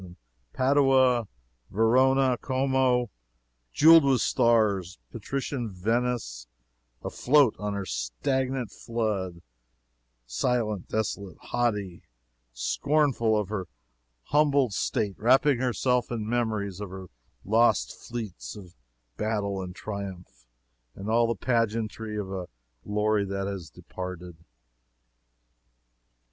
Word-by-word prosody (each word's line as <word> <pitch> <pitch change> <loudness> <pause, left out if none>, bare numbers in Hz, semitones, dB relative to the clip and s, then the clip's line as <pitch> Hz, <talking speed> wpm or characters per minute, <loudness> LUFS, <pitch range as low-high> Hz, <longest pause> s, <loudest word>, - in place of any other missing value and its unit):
And 90 -1 -12 0.4
Padua 130 -3 +3 0.4
Verona 130 +4 +3
Como, 130 -2 +1 0.6
jeweled 165 - +7
with 135 -4 +3
stars; 105 -6 +2
and - - -46
patrician 135 0 -3
Venice, 105 - -2 0.6
afloat 140 -3 +3
on 105 -1 -3
her 100 -1 -3
stagnant 125 - -2
flood 100 -7 -3 0.8
silent, 110 - -1
desolate, 100 -3 -3
haughty 105 -7 -2 0.5
scornful 115 - +1
of 100 -2 -3
her 95 -4 -3 0.6
humbled 140 - +2
state 100 +1 -1
wrapping 130 +3 +4
herself 125 0 +1
in 110 -3 -3
memories 110 -5 -1
of 105 - -5
her 95 0 -8 0.4
lost 115 +4 +3
fleets, 100 - -7
of 90 -4 -12 0.4
battle 105 -3 -1
and 90 -1 -7
triumph, 95 - -7 0.5
and 100 +3 -5
all 115 +1 +4
the 115 - -1
pageantry 110 -2 -1
of 100 -2 -4
a 95 -2 -4 0.4
glory 105 0 +1
that 100 0 -3
is 95 -5 -6
departed. 90 +2 -8
110 Hz, 105 wpm, -27 LUFS, 95-125 Hz, 0.8 s, jeweled